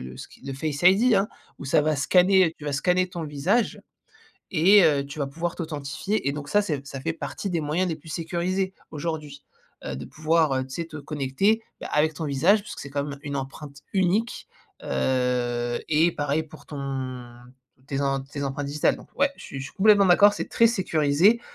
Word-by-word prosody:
le 65 Hz, -, -8 dB
le -, -, -11 dB
ski -, -, -12 dB
le 135 Hz, -, -4 dB
Face 145 Hz, +2 st, -3 dB
ID 205 Hz, +7 st, +5 dB
hein, 195 Hz, +1 st, +3 dB, 0.3 s
où -, -, -8 dB
ça 140 Hz, -, +3 dB
va 155 Hz, 0 st, +1 dB
scanner 180 Hz, +3 st, +4 dB
tu 150 Hz, -, -12 dB
vas 145 Hz, -, -2 dB
scanner 180 Hz, +6 st, +1 dB
ton 175 Hz, -3 st, -5 dB
visage 155 Hz, +11 st, 0 dB, 0.7 s
et 190 Hz, +4 st, +6 dB
heu, 145 Hz, -4 st, +3 dB
tu 140 Hz, +2 st, -9 dB
vas 140 Hz, -, -1 dB
pouvoir 165 Hz, +5 st, -4 dB
t'authentifier. 155 Hz, +4 st, -3 dB
Et 140 Hz, -, +1 dB
donc, 145 Hz, -1 st, -6 dB
ça 205 Hz, -, +4 dB
c'est 150 Hz, -8 st, -3 dB
ça 135 Hz, -1 st, -7 dB
fait 160 Hz, +5 st, -2 dB
partie 195 Hz, +4 st, -5 dB
des 170 Hz, -2 st, -1 dB
moyens 160 Hz, +5 st, 0 dB
les 165 Hz, -, -2 dB
plus 160 Hz, +1 st, -14 dB
sécurisés, 180 Hz, +4 st, -2 dB, 0.2 s
aujourd'hui, 150 Hz, -2 st, -5 dB, 0.4 s
heu, -, -, -4 dB
de 70 Hz, -, -6 dB
pouvoir, 155 Hz, -, +1 dB
heu, 130 Hz, 0 st, 0 dB
tu 130 Hz, -, -12 dB
sais, 170 Hz, -, -3 dB
te 160 Hz, -1 st, -9 dB
connecter, 150 Hz, +9 st, 0 dB, 0.2 s
bah, -, -, -6 dB
avec 155 Hz, +1 st, +3 dB
ton 155 Hz, +2 st, -4 dB
visage 155 Hz, +9 st, +3 dB
puisque 205 Hz, -, -9 dB
c'est 140 Hz, -, -7 dB
quand 140 Hz, 0 st, -2 dB
même 145 Hz, -1 st, -6 dB
une 140 Hz, -1 st, -4 dB
empreinte 140 Hz, +2 st, -7 dB, 0.2 s
unique. 195 Hz, +5 st, 0 dB, 0.4 s
Heu, 120 Hz, -2 st, 0 dB
et 160 Hz, +2 st, +3 dB
pareil, 145 Hz, 0 st, -1 dB
pour 155 Hz, 0 st, -15 dB
ton 130 Hz, -4 st, -5 dB, 0.5 s
tes 140 Hz, 0 st, -2 dB
em 135 Hz, -1 st, 0 dB
tes 140 Hz, +1 st, -6 dB
empreintes 140 Hz, +1 st, -3 dB
digitales. 145 Hz, +1 st, +1 dB
Donc, -, -, -14 dB
ouais! 280 Hz, 0 st, +3 dB
Je -, -, -12 dB
suis 135 Hz, -, -7 dB
je -, -, -5 dB
suis -, -, -15 dB
complètement 205 Hz, 0 st, +5 dB
d'accord, 200 Hz, +3 st, +6 dB
c'est -, -, -5 dB
très 230 Hz, -, +5 dB
sécurisé. 180 Hz, 0 st, +3 dB
155 Hz, 210 wpm, -25 LUFS, 140-180 Hz, 0.7 s, et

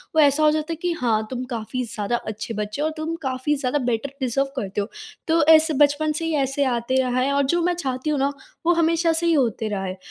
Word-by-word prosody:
वो 315 Hz, -, +6 dB
ऐसा 290 Hz, +1 st, +4 dB
हो 305 Hz, -, +6 dB
जाता 310 Hz, +1 st, -2 dB
है -, -, -4 dB
कि 355 Hz, -, 0 dB
हाँ, 220 Hz, -3 st, +1 dB
तुम 255 Hz, -1 st, -4 dB
काफ़ी 230 Hz, +3 st, -3 dB
ज़्यादा 215 Hz, 0 st, -2 dB
अच्छे 220 Hz, +1 st, -5 dB
बच्चे 210 Hz, +5 st, -4 dB
हो -, -, +1 dB
और 315 Hz, -, -3 dB
तुम 315 Hz, +1 st, -3 dB
काफ़ी 265 Hz, +1 st, -1 dB
ज़्यादा 275 Hz, +1 st, -1 dB
बेटर 240 Hz, +3 st, -1 dB
डिज़र्व 265 Hz, +2 st, 0 dB
करते 205 Hz, -4 st, -2 dB
हो। 200 Hz, -, -4 dB, 0.4 s
तो 325 Hz, -1 st, +3 dB
ऐसे 315 Hz, 0 st, +3 dB
बचपन 290 Hz, +2 st, +3 dB
से 315 Hz, +2 st, -3 dB
ही 325 Hz, -, -1 dB
ऐसे 275 Hz, 0 st, 0 dB, 0.2 s
आते 235 Hz, -, -21 dB
रहा 255 Hz, -1 st, 0 dB
है 275 Hz, +2 st, +1 dB
और 280 Hz, 0 st, +2 dB
जो 345 Hz, 0 st, +1 dB
मैं 355 Hz, +1 st, +2 dB
चाहती 265 Hz, -3 st, -3 dB
हूँ 295 Hz, -2 st, 0 dB
ना, 275 Hz, +1 st, +1 dB, 0.3 s
वो 345 Hz, -, +5 dB
हमेशा 335 Hz, 0 st, +2 dB
से 330 Hz, +1 st, -1 dB
ही 335 Hz, -, +3 dB
होते 230 Hz, -6 st, +1 dB
रहा 200 Hz, -2 st, -3 dB
है। 185 Hz, 0 st, -4 dB
280 Hz, 255 wpm, -23 LUFS, 240-310 Hz, 0.4 s, वो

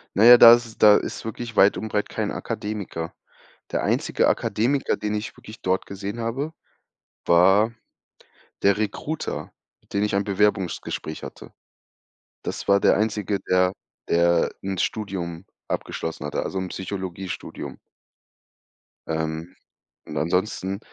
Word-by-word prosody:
Na 105 Hz, -, +4 dB
ja, 120 Hz, +1 st, +11 dB
da 115 Hz, 0 st, +11 dB
ist 120 Hz, 0 st, +3 dB
es 115 Hz, -, -13 dB
da 105 Hz, -1 st, +7 dB
ist -, -, -5 dB
wirklich 115 Hz, 0 st, -6 dB
weit 100 Hz, -, +5 dB
und 110 Hz, -, -4 dB
breit 105 Hz, -1 st, -1 dB
kein -, -, -2 dB
Akademiker. 100 Hz, -6 st, -4 dB, 0.6 s
Der -, -, -1 dB
einzige -, -, +1 dB
Akademiker, 125 Hz, +7 st, +1 dB
den 105 Hz, 0 st, -3 dB
ich 105 Hz, 0 st, -4 dB
wirklich 110 Hz, -, -13 dB
dort 95 Hz, +1 st, 0 dB
gesehen 100 Hz, +3 st, -6 dB
habe, 135 Hz, +7 st, -2 dB, 0.7 s
war 95 Hz, +6 st, +5 dB, 0.9 s
der 100 Hz, +1 st, +4 dB
Recruiter, 110 Hz, +9 st, -3 dB, 0.3 s
mit -, -, -21 dB
dem 100 Hz, -, +1 dB
ich 105 Hz, -, 0 dB
ein 100 Hz, -, +1 dB
Bewerbungsgespräch 95 Hz, -6 st, -1 dB
hatte. -, -, -10 dB, 0.9 s
Das -, -, -5 dB
war 100 Hz, 0 st, +5 dB
der -, -, +4 dB
Einzige, 105 Hz, -2 st, 0 dB
der 90 Hz, 0 st, +4 dB, 0.4 s
der 85 Hz, 0 st, +3 dB
'n 95 Hz, 0 st, -3 dB
Studium 95 Hz, -5 st, -3 dB, 0.2 s
abgeschlossen 80 Hz, -2 st, -4 dB
hatte, 75 Hz, -, -2 dB
also 95 Hz, -, -4 dB
'n 95 Hz, -, -3 dB
Psychologiestudium. 95 Hz, -1 st, -6 dB, 1.3 s
Ähm, 80 Hz, +2 st, -3 dB, 0.5 s
und 75 Hz, -, -6 dB
ansonsten, 95 Hz, +4 st, -1 dB
100 Hz, 135 wpm, -24 LUFS, 90-110 Hz, 1.3 s, ja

